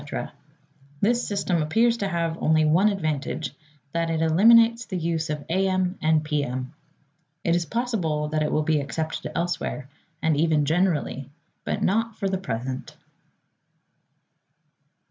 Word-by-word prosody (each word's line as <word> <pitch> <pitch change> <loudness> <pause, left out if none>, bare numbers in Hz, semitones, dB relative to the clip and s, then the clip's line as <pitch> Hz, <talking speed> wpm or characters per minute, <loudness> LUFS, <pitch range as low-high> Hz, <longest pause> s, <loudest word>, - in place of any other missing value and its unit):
This 240 +4 +1
system 190 -4 0
appears 230 +10 +2
to 200 - -1
have 170 -2 -2
only 155 0 +3
one 175 +7 +4
advantage, 155 -6 -2 0.4
that 165 +1 -1
it 165 0 0
eliminates 230 +7 +5
the 185 - -4
use 165 -1 -1
of 150 -1 -4
A. 190 +3 +1
M. 185 0 0
and 155 0 +3
P. 150 -1 0
M. 130 +1 -4 0.7
It 170 - +2
is 170 -1 -1
possible 190 -11 -1
that 155 0 0
it 150 - 0
will 155 - +1
be 155 0 +2
accepted 150 +3 -4
elsewhere, 170 -5 -2 0.3
and 160 -2 +1
even 155 -1 +2
generally, 155 -5 0 0.4
but - - -2
not 225 +3 +1
for 200 - -1
the 190 -1 -1
present. 130 -3 -5
165 Hz, 145 wpm, -25 LUFS, 150-190 Hz, 0.7 s, eliminates